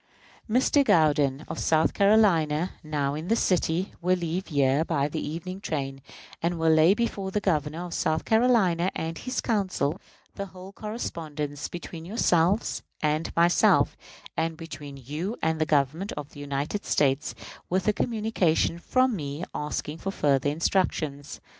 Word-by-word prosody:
Mr. 260 +5 +4
Gourdin, 150 - +3
of - - -5
South 160 0 +2
Carolina, 185 -6 +3
now 145 -2 -1
in 155 +3 -5
this 230 +3 +2
city, 180 +1 +1
will 180 +1 +2
leave 175 +2 -3
here 140 -1 +2
by 145 -4 0
the 150 - -4
evening's 185 +5 -5
train, 135 -6 -3 0.4
and 170 +1 0
will 165 0 +3
lay 160 +5 +6
before 210 -4 -2
the 210 - 0
Governor 160 -3 -1
of 175 - -7
South 155 0 0
Carolina 220 -7 +3
and 165 +1 -3
his 255 - -2
Council 190 - -1 0.3
the 200 -1 -5
whole 185 0 -11
correspondence 155 -9 -5
between 170 -1 -8
yourselves 185 0 +1 0.2
and 155 +1 0
myself, 170 +1 +4 0.4
and 165 -1 -1
between 150 -4 -8
you 155 - -4
and 160 0 0
the 155 - +2
Government 155 +6 +1
of 145 -1 -6
the 145 - -12
United 145 +7 -3
States, 140 0 +1 0.3
with 185 +2 0
a 215 - +4
communication 210 -8 +1
from 255 +5 +2
me, 145 -1 -5
asking 150 +1 -4
further 145 -8 +1
instructions. 150 -3 -1
165 Hz, 145 wpm, -26 LUFS, 150-190 Hz, 0.4 s, lay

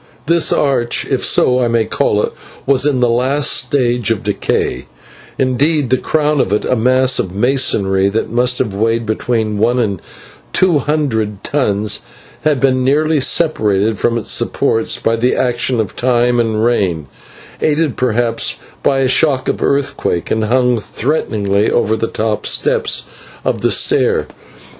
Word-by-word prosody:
This 170 +2 +2
arch 125 -4 +1
was 120 +2 0
in 140 -3 +1
the 125 - +3
last 130 +5 +1
stage 120 -5 +1
of 115 -3 -1
decay 100 -10 -2 0.5
indeed 135 +1 +1
the 130 - +4
crown 150 -2 0
of - - -2
it, 105 - 0
a 130 - +1
mass 130 +2 +2
of 95 0 -3
masonry 100 -5 +1
that 110 +2 -3
must 125 +1 +1
have 105 - -2
weighed 115 +3 -1
between 110 -1 -2
one 120 +3 +2
and 100 -7 -2 0.5
two 180 -5 +3
hundred 110 -10 -2
tons, 105 -7 0 0.4
had 150 -3 +1
been 130 -1 +1
nearly 150 +3 +1
separated 110 - +1
from 120 0 0
its 115 - -1
supports 115 0 0
by 115 - 0
the 120 +2 0
action 125 0 0
of 110 - -3
time 120 -1 +1
and 110 -1 0
rain, 95 -10 0 0.6
aided 155 -2 0
perhaps 120 -2 0 0.3
by 135 -1 +1
a 130 - +2
shock 130 0 +2
of - - -2
earthquake, 140 -11 -1
and 110 0 0
hung 125 +1 +1
threateningly 105 -5 -1
over 110 -2 +1
the 115 +1 -2
top 110 -2 -2
steps - - +1 0.4
of - - -1
the - - +1
stair. - - +2
120 Hz, 145 wpm, -15 LUFS, 110-135 Hz, 0.6 s, the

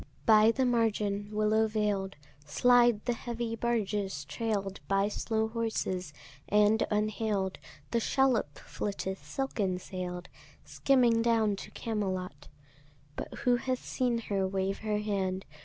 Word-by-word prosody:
By 215 0 +7
the 260 +3 +2
margin, 210 -4 0
willow 215 +1 +2
veil'd 205 -3 -1 0.3
Slide 240 +8 +4
the 240 - +1
heavy 235 -1 -4
barges 210 -4 -1
trail'd 200 -4 -2
By 195 +1 +2
slow 220 +1 -1
horses; 220 -7 -2 0.4
and 210 +2 +4
unhail'd 210 -2 -1 0.3
The 235 - +2
shallop 245 - +1
flitteth 195 -2 -4
silken 210 -9 -2
sail'd 180 -1 -6 0.4
Skimming 245 -4 +3
down 225 -3 +2
to - - -8
Camelot: 185 -9 -4 0.7
But - - -6
who 245 -1 +4
hath 255 +1 -3
seen 245 -2 0
her 195 -3 -1
wave 195 +1 -1
her 215 -1 -1
hand? 195 -3 -2
210 Hz, 125 wpm, -30 LUFS, 195-230 Hz, 0.7 s, By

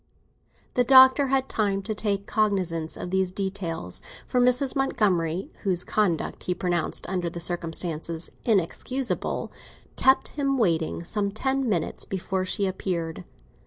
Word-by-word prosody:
The 250 - +3
Doctor 260 +2 +7
had 265 0 +1
time 200 -4 0
to 215 +2 -2
take 200 -2 -1
cognisance 185 -7 0
of 180 - -6
these 190 -1 +1
details, 190 -3 -4 0.2
for 250 - +1
Mrs. 250 +2 +3
Montgomery, 190 - 0
whose 180 -3 +1
conduct 185 -7 0
he 180 - 0
pronounced 175 -3 -2
under 180 -2 -1
the 170 - -7
circumstances 165 -1 -2
inexcusable, 235 +5 -1 0.5
kept 265 +1 +4
him 275 -2 -1
waiting 170 -7 +1
some 200 +3 -1
ten 265 +4 -1
minutes 175 -6 -1
before 190 0 -2
she 200 +2 +1
appeared. 170 - -3
195 Hz, 130 wpm, -26 LUFS, 175-240 Hz, 0.5 s, Doctor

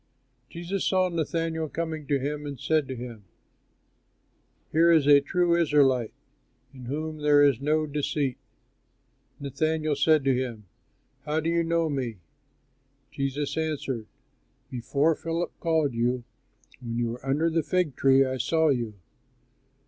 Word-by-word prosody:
Jesus 175 +3 -4
saw 185 -1 +2
Nathanael 165 -1 -2
coming 160 -3 -4
to 145 - +2
him 145 +2 -3
and 140 -3 -7
said 155 -1 +1
to 130 - -5
him, 120 -3 -8 1.5
"Here 165 +2 +4
is 160 -4 +4
a 145 -1 +7
true 175 +4 +1
Israelite, 140 -8 +3 0.6
in 130 -2 -11
whom 155 +4 -4
there 145 -1 +5
is 140 -4 +3
no 155 +2 +1
deceit." 145 -2 -2 1.0
Nathanael 155 +2 -1
said 150 +1 +3
to 135 -1 +3
him, 120 -4 -4 0.6
"How 150 +1 0
do 160 +1 -1
you 170 0 +2
know 165 0 +1
me?" 130 -7 -3 0.9
Jesus 140 0 -2
answered, 145 -8 -3 0.6
"Before 140 +5 +1
Philip 165 +2 -3
called 160 -5 +1
you, 120 +1 0 0.6
when 115 -1 -4
you 120 -1 0
were 120 +2 -7
under 150 +5 +1
the 165 0 +2
fig 175 -2 0
tree, 135 0 +4
I 130 0 -2
saw 160 +5 +2
you." 120 -6 -1
145 Hz, 140 wpm, -26 LUFS, 130-160 Hz, 1.5 s, a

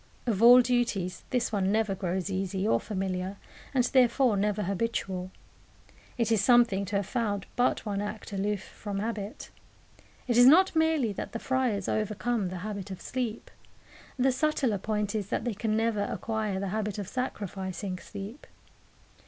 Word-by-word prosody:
Of 220 -4 0
all 245 +2 +9
duties 235 -7 0
this 245 -2 0
one 195 -2 +1
never 215 -2 +1
grows 185 0 -2
easy 190 +1 -1
or - - +3
familiar, 190 -1 -3 0.3
and 260 -3 +2
therefore 250 -2 +3
never 210 +1 0
habitual. 190 -2 -2 0.9
It 230 -2 +1
is 215 -3 +3
something 235 -5 +4
to 200 +2 -4
have 200 -1 +1
found 205 -4 -2
but 245 -1 +1
one 200 -1 -2
act 205 0 -6
aloof 200 0 -1
from 205 -2 -6
habit. 210 0 -4 0.8
It 240 -2 +2
is 245 - +9
not 360 +6 +6
merely 320 -9 +2
that - - -6
the - - -2
friars 245 -6 0
overcome 215 -1 -1
the 185 - -5
habit 200 -2 -5
of 190 - -6
sleep. 240 -3 -4 0.7
The 265 +1 +3
subtler 260 -6 +1
point 210 0 -1
is 205 -3 -3
that 225 - -2
they 240 - -1
can 215 +1 -1
never 225 -2 +1
acquire 215 -3 -2
the 195 0 -2
habit 210 0 -2
of 200 -3 -4
sacrificing 195 -6 -4
sleep. 205 +9 -9
210 Hz, 160 wpm, -28 LUFS, 195-240 Hz, 0.9 s, all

